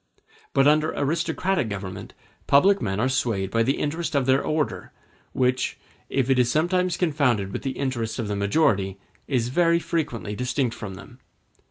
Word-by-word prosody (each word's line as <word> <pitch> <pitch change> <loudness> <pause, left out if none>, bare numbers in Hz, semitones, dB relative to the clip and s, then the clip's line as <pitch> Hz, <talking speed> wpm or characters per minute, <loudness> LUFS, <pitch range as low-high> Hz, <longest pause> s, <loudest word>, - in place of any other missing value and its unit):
But 135 +1 +4
under 155 +1 +3
aristocratic 160 - 0
governments 95 -2 -6 0.3
public 195 +8 +5
men 95 +1 -2
are 125 - +2
swayed 115 -7 -1
by 115 - +2
the 130 +4 +1
interest 155 +1 -2
of 140 -2 +2
their 135 +1 +3
order, 155 -1 -2 0.4
which, 130 0 0 0.3
if 135 -3 0
it 135 -1 +3
is 120 -1 +3
sometimes 175 +3 +1
confounded 130 - +1
with - - -3
the 135 -1 -4
interests 120 -5 -2
of 115 -4 -3
the 105 - -2
majority, 100 -3 +1 0.3
is 125 -4 0
very 170 +4 +3
frequently 130 -11 -3
distinct 125 +1 -1
from 105 -5 -7
them. 120 +6 -13
130 Hz, 165 wpm, -24 LUFS, 110-155 Hz, 0.4 s, public